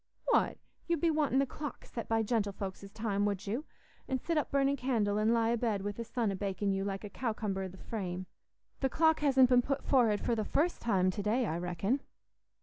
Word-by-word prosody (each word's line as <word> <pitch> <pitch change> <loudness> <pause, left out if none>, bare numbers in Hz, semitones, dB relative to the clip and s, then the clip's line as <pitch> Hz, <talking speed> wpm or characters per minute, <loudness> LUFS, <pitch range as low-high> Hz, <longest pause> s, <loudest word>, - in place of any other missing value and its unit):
"What! - - +3 0.3
You'd 340 -2 +1
be 330 +2 +3
wanting 300 -4 +1
the 275 - +4
clock 295 +2 -7
set 230 - -6
by 225 0 +2
gentlefolks's 200 -3 -2
time, 210 -2 -1
would 200 -2 -1
you? 235 +9 -2 0.4
An' 265 - 0
sit 335 +6 -2
up 300 - +1
burnin' 275 0 +2
candle, 225 -6 0
an' 215 +1 +3
lie 230 -1 +3
a 235 - +2
bed 220 -4 0
wi' 205 - -1
the 230 +3 -6
sun 230 -2 -1
a - - -2
bakin' 200 +1 -1
you 195 0 -1
like 195 0 -3
a - - -4
cowcumber 215 -5 -2
i' - - -3
the 185 +1 -12
frame? 185 -4 -4 0.5
The 265 - +1
clock 320 +4 +3
hasn't 265 -3 +5
been 250 -1 +6
put 275 +2 -2
forrard 230 -6 +3
for - - 0
the 220 -2 0
first 325 - 0
time 185 -5 +2
to 205 - -4
day, 225 +5 +1
I 165 -4 -2
reckon." 180 +9 -1
225 Hz, 225 wpm, -32 LUFS, 200-265 Hz, 0.5 s, been